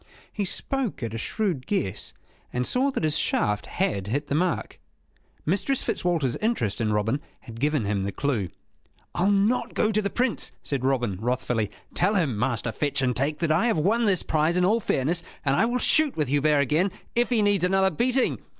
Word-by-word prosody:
He 205 - -2
spoke 255 - -2
at 115 -1 -3
a 115 - -3
shrewd 180 - -2
guess, 105 - -2 0.4
and 125 0 -1
saw 260 - +2
that 265 - -3
his 155 0 +2
shaft 105 0 0
had 100 - -1
hit 145 +7 -2
the - - 0
mark. 170 +3 -1 0.7
Mistress 205 - 0
Fitzwalter's 165 -8 0
interest 210 - -1
in 110 -1 +1
Robin 110 +7 0 0.2
had 115 -1 -10
given 145 -3 +1
him 100 -1 0
the 100 +1 -2
clue. 115 -7 -1 0.6
"I'll 185 +3 +2
not 205 +5 +1
go 215 - +2
to 215 0 +1
the 200 - -1
Prince," 245 0 -1
said 140 -3 -3
Robin, 125 -7 0
wrathfully. 120 -3 -1 0.2
"Tell 200 +4 +2
him, 155 - +1
Master 115 +1 -1
Fetch 140 +3 -1
and 125 -2 +1
Take, 145 +3 0
that 165 -1 0
I 170 +9 +3
have 225 - +1
won 220 +9 +2
this 195 -4 +2
prize 160 +3 +1
in 180 - +3
all 215 +5 +3
fairness; 165 - 0 0.2
and 135 -1 +3
I 220 - +3
will 240 +2 0
shoot 300 - +3
with 150 -4 0
Hubert 145 +1 +3
again, 155 +8 +2 0.2
if 240 0 +1
he 230 -4 +2
needs 205 -3 +2
another 190 +1 +3
beating." 250 - +1
155 Hz, 195 wpm, -25 LUFS, 125-205 Hz, 0.7 s, I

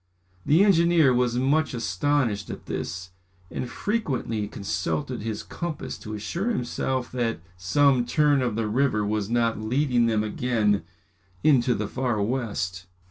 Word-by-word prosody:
The 160 +7 +6
engineer 170 -7 +5
was 120 -1 +1
much 140 +3 +1
astonished 115 - 0
at - - -7
this, 90 +2 -5 0.4
and 125 - -4
frequently 130 - -2
consulted 90 - -3
his 110 -1 -4
compass 170 -4 -5
to 110 -1 -6
assure 170 - -2
himself 130 - -2
that 120 -2 -1 0.2
some 125 +7 +3
turn 145 -1 +3
of 120 -4 -1
the 115 -1 -1
river 110 -2 +1
was 105 -1 -1
not 115 -2 +1
leading 125 +1 +2
them 110 -2 +1
again 110 -2 +1 0.6
into 130 -5 +4
the 105 - -2
Far 125 -1 -1
West. 100 -5 -2
120 Hz, 135 wpm, -25 LUFS, 105-140 Hz, 0.6 s, The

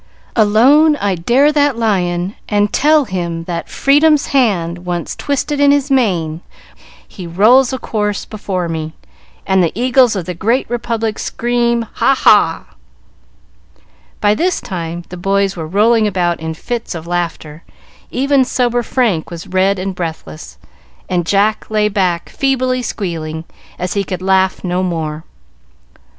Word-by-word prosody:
Alone 255 +9 +5
I 200 -8 -1
dare 245 - +3
that 290 -4 +1
Lion, 185 -4 0 0.2
and 205 -1 +1
tell 300 0 +3
him 170 -4 -4
that 170 0 -5
Freedom's 295 +2 +3
hand 185 -11 +1
once 175 -1 -4
twisted 285 +1 -2
in 285 0 +5
his 285 0 +1
mane, 175 -11 0 0.7
he 180 -3 -9
rolls 230 +9 +4
a 260 - -2
corse 210 -4 -2
before 190 -4 -4
me, 160 -1 -4 0.5
and 190 -1 +2
the 165 - +1
Eagles 250 0 +3
of 185 -4 -3
the 180 - -4
Great 230 +9 0
Republic 230 -2 -2
scream, 235 -1 0
Ha, 270 - +2
ha!" 205 -10 +3 1.5
By 205 0 +3
this 350 +11 0
time 170 -3 -5
the 180 - -8
boys 195 +2 0
were 160 -3 -5
rolling 215 +5 +3
about 175 -3 0
in 160 0 -5
fits 235 +3 -5
of 165 -1 -7
laughter; 170 -3 -4 0.5
even 275 +1 +2
sober 245 -1 0
Frank 225 -9 0
was 170 0 -8
red 190 +2 +1
and 190 +1 -3
breathless, 160 - -7 0.5
and 175 -2 -1
Jack 205 +3 +1
lay 215 -1 +1
back, 180 -4 -1
feebly 255 -2 0
squealing, 165 -8 -4 0.3
as 180 0 -3
he 200 - 0
could 185 -1 -5
laugh 190 0 +1
no 180 0 -1
more. 160 -3 -3
200 Hz, 145 wpm, -16 LUFS, 175-245 Hz, 1.5 s, Alone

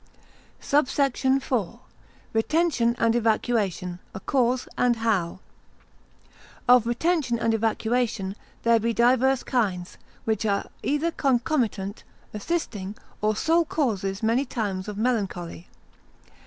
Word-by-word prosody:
SUBSECT. 280 -2 +1
IV.—Retention 255 - 0
and 230 0 +2
Evacuation 215 -6 0 0.2
a - - -4
cause, 250 +3 +1
and 245 -1 +3
how. 205 -6 -1 1.3
Of 245 -2 +6
retention 260 0 +1
and 230 -1 +1
evacuation, 225 -2 0 0.3
there 230 -1 +4
be 230 +1 -1
divers 255 +2 +3
kinds, 190 -8 -1 0.3
which 220 -1 0
are 200 -2 0 0.2
either 295 +4 0
concomitant, 240 -8 0 0.3
assisting, 210 - -3 0.3
or 215 0 +2
sole 330 +9 +3
causes 205 - -1
many 230 +5 +2
times 210 -8 -3
of 210 -1 -5
melancholy. 195 -7 -2
230 Hz, 100 wpm, -25 LUFS, 205-255 Hz, 1.3 s, Of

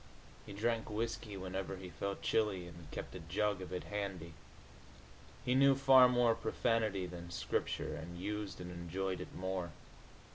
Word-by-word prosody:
He - - -7
drank 115 +2 0
whisky 110 -1 -2
whenever 95 +1 -3
he 90 -1 -8
felt 100 +2 -3
chilly, 105 -5 +2
and 85 -2 -11
kept - - -6
a 90 - -6
jug 95 +4 0
of 90 - -7
it 90 - -3
handy. 95 -5 -4 1.1
He 125 - +3
knew 135 +1 +6
far 130 -1 +8
more 120 -2 +4
profanity 110 -4 +1
than 85 -1 -7
Scripture, 90 - -1
and 85 +2 -7
used 105 0 -3
and 90 0 -6
enjoyed 90 +2 -3
it - - -8
more. 95 -3 -2
95 Hz, 155 wpm, -36 LUFS, 90-110 Hz, 1.1 s, far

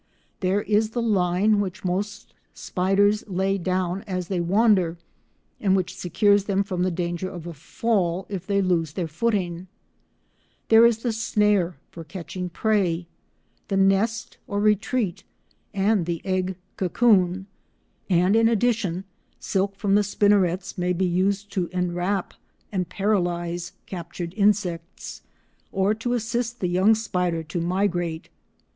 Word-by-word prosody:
There 195 +1 +1
is 215 +1 +2
the - - +2
line 200 0 +2
which 190 -1 -4
most 200 +3 -3 0.2
spiders 200 +3 +1
lay 195 +1 0
down 185 +1 -1
as 185 -2 -3
they 190 -3 -1
wander, 185 -2 +3 0.6
and 195 -2 +2
which 185 -1 -1
secures 200 +3 +2
them 200 -1 +1
from 185 -3 -3
the 185 - +2
danger 175 +1 -3
of 175 -3 -8
a 170 - -6
fall 185 +3 -1
if 190 -3 -6
they 200 -1 +2
lose 165 -5 0
their 175 -1 -2
footing; 180 0 -1 1.0
there 225 +1 +8
is 230 -1 -1
the 240 - +1
snare 210 -5 +1
for 165 - -9
catching 180 +1 -6
prey, 180 -3 0 0.6
the 195 - 0
nest 195 +3 +1
or 205 - -2
retreat, 210 -2 +1 0.5
and 200 -3 +1
the 170 -1 -2
egg 185 -1 -1 0.2
cocoon, 190 -2 +2 0.6
and 180 +2 +3
in 225 0 +5
addition, 220 -6 0 0.4
silk 195 +1 -1
from 200 0 0
the 205 +1 +5
spinnerets 200 -3 +1
may 180 0 +1
be 185 +2 0
used 195 +3 0
to 185 -4 -1
enwrap 180 +1 -1 0.4
and 180 -4 -2
paralyse 175 -3 -1
captured 170 -1 -6
insects, 195 -5 -1 0.5
or 195 +2 +2
to 230 +3 -2
assist 235 +1 -2
the 180 - -1
young 190 +5 +4
spider 180 -6 -1
to 160 +2 -4
migrate. 175 -2 -1
190 Hz, 140 wpm, -24 LUFS, 175-205 Hz, 1.0 s, there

